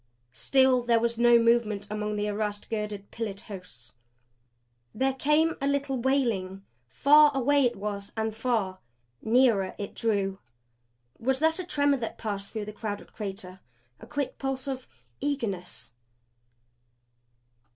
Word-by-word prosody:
Still 260 - +3
there 235 -1 +3
was 235 0 -1
no 240 0 +7
movement 230 -3 +2
among 210 0 -2
all 210 - -2
the 210 0 -1
arrased, 210 0 -3
girdered, 210 -2 -4
pillared 210 -4 -4
hosts. 180 - -10 1.0
There 265 +4 +1
came 300 +4 +2
a 275 - +1
little 280 -1 0
wailing; 230 -8 0 0.2
far 295 - +6
away 280 +1 +3
it 240 - +1
was 200 0 -5
and 220 0 -1
far. 220 -5 -1 0.4
Nearer 225 -5 +3
it 200 - -5
drew. 200 -4 -1 0.8
Was 265 +3 +1
that 320 +4 +2
a - - -2
tremor 285 -5 +2
that 230 -3 -5
passed 200 -3 -4
through 215 -2 -4
the 210 - -7
crowded 205 -1 -6
crater? 195 -3 -6 0.4
A - - -12
quick 285 -2 -3
pulse 270 0 -3
of 265 -2 -4 0.3
eagerness? 225 - -3
225 Hz, 140 wpm, -28 LUFS, 205-265 Hz, 1.0 s, no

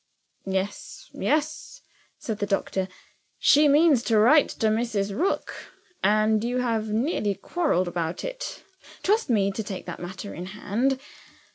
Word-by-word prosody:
"Yes, 190 +1 -4
yes," 310 +10 -1 0.4
said 220 -2 -5
the 205 - -1
doctor; 195 -1 -1 0.5
"she 295 +1 +5
means 290 -2 +5
to 225 - +3
write 265 +8 +6
to 220 - 0
Mrs. 215 -3 -1
Rook 365 - -1 0.5
and 215 +1 +3
you 245 +2 -1
have 225 -3 0
nearly 215 - 0
quarreled 290 - 0
about 170 -1 -3
it. - - -6 0.4
Trust 425 -5 +2
me 200 -4 +2
to 210 - -4
take 200 -3 -6
that 175 - -6
matter 185 +3 -7
in 180 +1 -6
hand. 225 +7 -1
220 Hz, 140 wpm, -25 LUFS, 195-280 Hz, 0.5 s, write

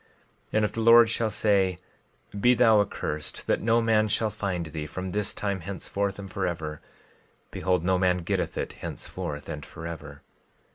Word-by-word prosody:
12:19 - - -33 0.5
And 110 0 +3
if - - -2
the 115 - -3
Lord 115 0 +8
shall 115 -1 0
say—Be 100 +3 0
thou 115 -4 +6
accursed, 75 -6 -4
that - - +1
no 115 +1 +3
man 110 -1 +3
shall 110 +1 +1
find 90 -5 -2
thee 80 -1 -5
from 95 +4 -5
this 105 +1 -1
time 100 -2 -2
henceforth 100 +2 -3
and 100 -1 -8
forever—behold, 85 +1 -4
no 95 0 +2
man 90 -1 +2
getteth - - -1
it - - -3
henceforth 75 -1 -6
and 75 -1 -5
forever. 85 +1 -8
95 Hz, 155 wpm, -27 LUFS, 85-110 Hz, 0.5 s, Lord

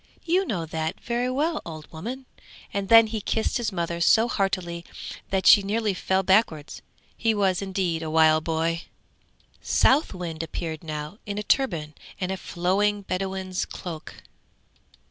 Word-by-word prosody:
You 365 +3 +2
know 175 -6 -2
that 160 0 -3
very 240 +1 -1
well, 305 +5 0
old 155 -2 -9
woman!' 240 +12 -6 0.5
and 200 -1 -2
then 225 0 +9
he 220 -1 -4
kissed 220 +4 0
his 235 -3 -2
mother 170 -2 -2
so 225 +6 +5
heartily 185 -6 -1 0.5
that 190 -1 0
she 205 - +9
nearly 210 +1 0
fell 190 +1 0
backwards; 185 -7 +1 0.3
he 225 -1 +1
was 190 -3 +1
indeed 185 -4 -1
a 160 - -4
wild 155 0 +4
boy. 165 +1 0 0.8
The - - -16
Southwind 180 - +2
appeared 160 0 -5
now 155 +5 -6
in 205 0 -3
a 210 - -2
turban 170 - 0 0.3
and 185 0 -2
a 190 - -2
flowing 200 +4 0
bedouin's 190 0 -2
cloak. 165 -4 -8
190 Hz, 150 wpm, -25 LUFS, 165-215 Hz, 0.8 s, then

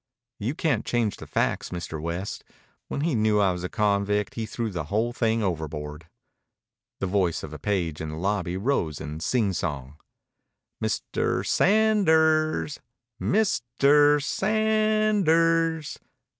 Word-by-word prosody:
"You 120 +7 -2
can't 145 -10 0
change 115 -4 -1
the - - -10
facts, - - -1
Mr. 85 -3 -5
West. 85 +5 -4 0.4
When - - -3
he 160 0 0
knew 110 -2 +2
I 100 -2 +3
was 90 0 -5
a 90 - -3
convict 105 -1 0
he 115 -1 -4
threw 115 -1 -3
the 85 -5 -4
whole 110 +8 -1
thing 115 -1 0
overboard." 80 -3 -4 0.9
The - - -1
voice 90 -3 0
of 75 - -7
a 75 - -8
page 85 -4 -2
in 80 - -4
the 75 - -6
lobby 95 0 -1
rose 95 - -1
in 75 +1 -6
sing 100 +4 0
song. 70 -3 -4 0.8
"Mister - - -1
Sa - - +2
a 220 +3 +4
anders. 160 -6 +2 0.4
Mis 210 - +1 0.2
ter 145 +1 +5
Sa 150 +6 -2
a - - +2
a 215 0 +2
anders." 165 -6 +2
110 Hz, 155 wpm, -25 LUFS, -, 0.9 s, ter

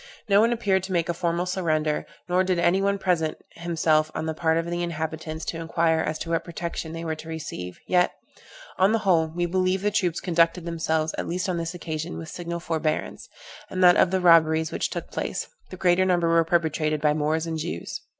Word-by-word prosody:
No 200 0 +5
one 230 +2 +3
appeared 200 -5 +1
to 190 - -8
make 170 -2 0
a - - +1
formal 170 +1 -1
surrender, 155 -5 0 0.2
nor 180 +1 +2
did 185 -1 0
any 175 +3 +3
one 200 0 +1
present 170 -5 0
himself 160 -2 +1
on - - -2
the 160 - -2
part 160 0 +1
of 165 - 0
the 175 0 -2
inhabitants, 160 -1 -4
to 165 - -4
inquire 165 0 +1
as 155 0 -1
to 165 - -5
what 165 - +1
protection 170 -1 -5
they 165 +1 -6
were 160 - -1
to 160 +1 -9
receive, 145 - -6
yet, 180 -1 +3 0.7
on 190 +3 +4
the - - +4
whole, 165 -4 +4
we 175 +2 -2
believe 185 +2 0
the 210 - +2
troops 180 -5 0
conducted 170 0 +1
themselves, 160 -2 -1
at - - -3
least 180 +3 -2
on 180 -2 -1
this 165 +1 -3
occasion, 160 -1 -5
with 160 - -7
signal 170 -1 -5
forbearance; 160 -2 -2 0.4
and 185 0 -1
that 175 0 +8
of - - +4
the 190 +1 +1
robberies 160 -2 +4
which - - -1
took - - -6
place, - - -3 0.2
the 185 - -8
greater 180 0 +3
number 175 -2 +2
were 165 0 +4
perpetrated 160 -2 0
by 150 0 +3
Moors 155 +2 0
and 160 -1 -3
Jews. 85 - -5
170 Hz, 215 wpm, -25 LUFS, 160-180 Hz, 0.7 s, that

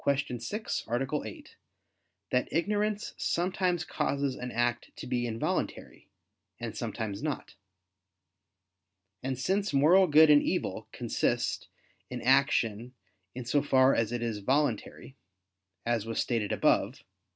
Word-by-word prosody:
6, 140 - -2
A. 135 +5 -1
8) 105 - -11 0.8
that 125 0 0
ignorance 205 +5 0
sometimes 180 0 0
causes 140 -1 -1
an 125 0 -6
act 120 0 -1
to - - -8
be 120 -1 -1
involuntary, 115 0 -3 0.5
and - - -5
sometimes 105 -3 -4
not. 150 -1 -4 1.7
And 130 0 -3
since 195 +7 0
moral 170 +7 +6
good 155 0 +7
and 145 0 +7
evil - - -2
consist - - -1 0.4
in - - -5
action 125 -3 +2 0.4
in 125 -1 -6
so 140 +4 +2
far 135 -1 +4
as 115 -1 0
it 120 -1 -2
is 115 -3 -2
voluntary, 135 +2 -1 0.7
as 115 -2 0
was 115 - -2
stated 115 -4 0
above - - +1
(A. - - -41
135 Hz, 125 wpm, -29 LUFS, 120-155 Hz, 1.7 s, good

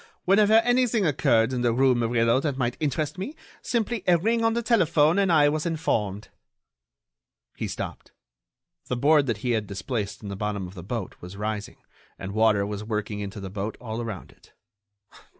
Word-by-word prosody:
Whenever 205 +3 +4
anything 245 -3 +2
occurred 130 -5 +2
in 125 - -1
the 120 -1 +2
rue 130 +2 +4
Murillo 115 0 +2
that 140 -2 -2
might 120 -2 -1
interest 150 +2 -2
me, 270 +12 -5 0.3
simply 235 -3 -1
a 175 -1 +6
ring 225 +6 +1
on 225 0 +2
the 235 - -1
telephone 170 -7 +3
and 195 -3 +2
I 150 -3 +5
was 155 +1 0
informed." 105 - -2 1.3
He - - -3
stopped. - - -6 0.8
The 125 - -2
board 145 +2 +4
that 115 -4 0
he 125 - +1
had 110 -3 0
displaced 105 +1 -4
in 100 - -6
the 100 - -4
bottom 105 -1 -3
of 90 - -11
the 90 - -9
boat 100 +1 -5
was 90 +3 -9
rising 105 0 -4 0.4
and 95 - -6
water 110 -1 +3
was 105 0 -5
working 105 -1 -3
into 100 0 -6
the 95 -1 -7
boat 100 +2 -4
all 115 -1 -5
around 110 -6 -6
it. - - -24
120 Hz, 185 wpm, -25 LUFS, 105-160 Hz, 1.3 s, a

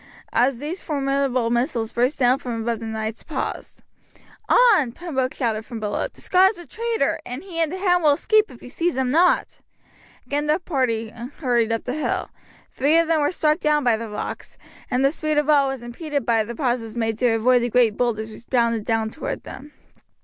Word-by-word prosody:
As 250 +1 +3
these 305 +8 -5
formidable 275 -5 0
missiles 235 -2 0
burst 250 +5 +1
down 255 0 +3
from 245 -5 -4
above 230 -1 -1
the 225 - -6
knights 220 0 -4
paused. - - -5 0.7
"On!" 415 - +5
Pembroke 265 -5 -3
shouted 225 -4 -1
from 230 0 -7
below; 210 -1 -2
"the - - -16
Scot 375 +1 +5
is 410 - -6
a 345 - -10
traitor, 460 +3 -1
and 250 +6 -7
he 360 -4 -6
and 320 -2 +1
the 370 - -4
hound 360 -2 +2
will 295 -2 +6
escape 430 +8 +2
if 240 - -14
you - - -9
seize 335 +3 -1
him 260 -1 0
not." 345 +5 +2 0.7
Again 290 +1 -2
the 305 +1 +3
party 255 -10 -1
hurried 240 0 -1
up 225 - -1
the 250 - -3
hill. 310 - -2 0.4
Three 290 +5 +2
of 335 -1 +3
them 320 -2 +2
were 290 - +2
struck 305 -2 +1
down 300 -2 +2
by 240 -3 +3
the 225 0 -6
rocks, 210 - -6 0.3
and 255 +2 +1
the 275 - +4
speed 310 -1 -1
of 295 0 +3
all 285 -2 +4
was 270 -3 -4
impeded 285 +4 -4
by 225 -2 +2
the 235 +2 -7
pauses 240 -3 -2
made 225 -1 -1
to 245 -3 +3
avoid 245 +2 +3
the 240 - -1
great 235 -3 +3
boulders 220 -2 -1
which 230 +2 -13
bounded 235 -3 +1
down 225 -1 0
toward 315 - -5
them. 290 +3 -10
255 Hz, 210 wpm, -22 LUFS, 230-305 Hz, 0.7 s, will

